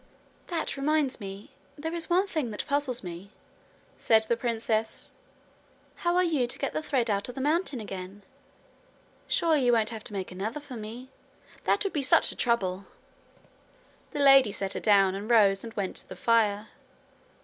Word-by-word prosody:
'That 335 -5 -2
reminds 290 -2 0
me 200 +5 -9 0.3
there 320 +3 -4
is 335 -2 -3
one 365 +3 +3
thing 310 - -2
that 210 - -5
puzzles 280 -5 -1
me,' 180 +2 -8 0.7
said 220 -1 +4
the 225 +2 +3
princess: 225 -2 -2 0.8
'how 345 0 0
are 365 - +4
you 300 -8 +1
to - - -6
get 275 - -3
the - - -1
thread 265 -6 0
out 200 +1 -1
of 250 - -8
the - - -5
mountain 300 -1 0
again? 195 -1 -8 1.0
Surely 315 -5 +2
you 245 - +4
won't 225 -1 +2
have 220 -2 -7
to - - -6
make 190 -2 -4
another 210 +9 -4
for 285 -3 -10
me? 230 +4 -8 0.6
That - - +2
would 395 - -3
be 295 - 0
such 265 - +4
a - - -9
trouble!' 195 -5 0 1.2
The 290 - -3
lady 270 -5 +7
set 195 0 -3
her - - -3
down 195 -3 +4
and 200 +3 -6
rose 200 -4 +4
and 230 - -7
went 195 -3 -3
to - - -8
the - - -8
fire. 220 -2 +1
235 Hz, 180 wpm, -28 LUFS, 205-285 Hz, 1.2 s, lady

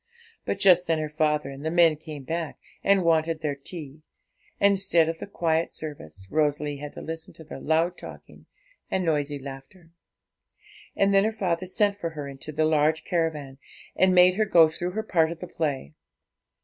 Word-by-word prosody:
But - - -1
just 180 -2 +5
then 165 -1 +2
her 155 -1 -3
father 150 -2 0
and 135 +1 -9
the 160 - -1
men 165 -2 +4
came 150 -2 -9
back 165 +1 -4 0.3
and 195 -2 +4
wanted 165 -1 +1
their 150 -2 -1
tea; 145 +1 -9 0.6
and, 200 0 +5
instead 185 -4 +3
of 165 0 -3
the - - -7
quiet 165 -4 0
service, 95 - -9
Rosalie 150 -1 0
had 145 +1 -8
to - - -9
listen 160 0 -7
to 160 - -10
their 155 - -9
loud 165 +3 0
talking - - -12 0.4
and 185 -1 -1
noisy 145 -2 0
laughter. 140 +5 -11 1.0
And 200 0 +2
then 195 0 +5
her 220 - +1
father 185 -4 -2
sent 200 +2 +1
for 170 -4 -3
her 145 -1 -4
into 140 +2 -7
the 155 +1 +1
large 155 0 +2
caravan, 150 -6 -2 0.4
and 185 -1 +3
made 180 +1 +6
her 215 - +3
go 170 -5 +6
through 175 +3 -4
her 220 +2 -2
part 165 -6 +2
of 170 - -6
the - - -6
play. 140 - -3
160 Hz, 190 wpm, -26 LUFS, 150-180 Hz, 1.0 s, made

